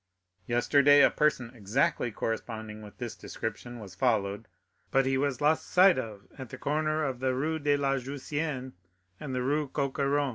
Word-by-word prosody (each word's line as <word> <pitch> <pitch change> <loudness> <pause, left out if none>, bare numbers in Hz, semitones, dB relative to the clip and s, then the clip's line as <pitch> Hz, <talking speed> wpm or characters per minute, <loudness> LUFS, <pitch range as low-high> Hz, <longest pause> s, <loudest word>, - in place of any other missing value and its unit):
Yesterday 140 +4 +5
a - - +6
person 135 -6 +1
exactly 125 - 0
corresponding 110 -1 -4
with 105 -1 -12
this 120 -2 -5
description 120 +2 -6
was 100 -5 -10
followed, 105 -1 0 0.4
but 135 0 +3
he 135 0 +1
was 140 +1 -1
lost 155 +2 +2
sight 185 -3 +6
of 105 -5 -7
at 130 -3 -7
the 130 - -8
corner 155 +3 0
of 130 -4 -2
the 130 0 0
Rue 155 +4 -1
de 145 -1 +2
la 135 -1 +1
Jussienne 140 0 -4 0.5
and 135 -3 -5
the 125 - -1
Rue 145 +3 0
Coq 140 0 -2
Héron." 140 0 +2
130 Hz, 175 wpm, -29 LUFS, 120-145 Hz, 0.5 s, a